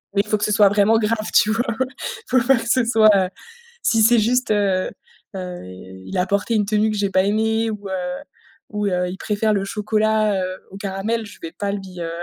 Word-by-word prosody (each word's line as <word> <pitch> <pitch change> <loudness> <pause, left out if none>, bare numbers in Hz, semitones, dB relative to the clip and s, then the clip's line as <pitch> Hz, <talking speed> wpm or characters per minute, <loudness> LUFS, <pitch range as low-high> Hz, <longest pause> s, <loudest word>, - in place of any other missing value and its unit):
mais 200 - +4
il - - -17
faut 215 - +1
que - - -3
ce - - -1
soit 205 -1 +5
vraiment 205 +2 +3
grave 215 0 -1
tu 215 - +4
vois? 225 +2 +1 0.6
Faut 255 - +3
pas 270 -1 +5
que 230 - -5
ce 255 +2 +3
soit 220 -2 +5
heu, 190 -2 +2 0.5
si 225 - +3
c'est 235 +2 +5
juste, 250 +4 +1
heu 195 -3 +1 0.5
heu, 180 -1 -6
il 95 - -9
a 180 - +2
porté 200 +4 0
une 210 -2 +2
tenue 215 +1 +1
que 215 - -3
j'ai 200 -1 0
pas 185 0 +3
aimé 220 +2 +1
ou 205 -2 -6
heu, - - -3 0.8
ou 210 -1 -2
heu, 180 -1 0
il 185 - -6
préfère 215 +1 0
le 195 -1 -1
chocolat, 215 -1 +1
heu, 185 0 -5
au 195 - -9
caramel, 200 +3 -3
je - - -13
vais 165 - -6
pas 200 -1 -3
lui, 190 -3 -7
heu, 165 - -3
210 Hz, 225 wpm, -21 LUFS, 190-220 Hz, 0.8 s, soit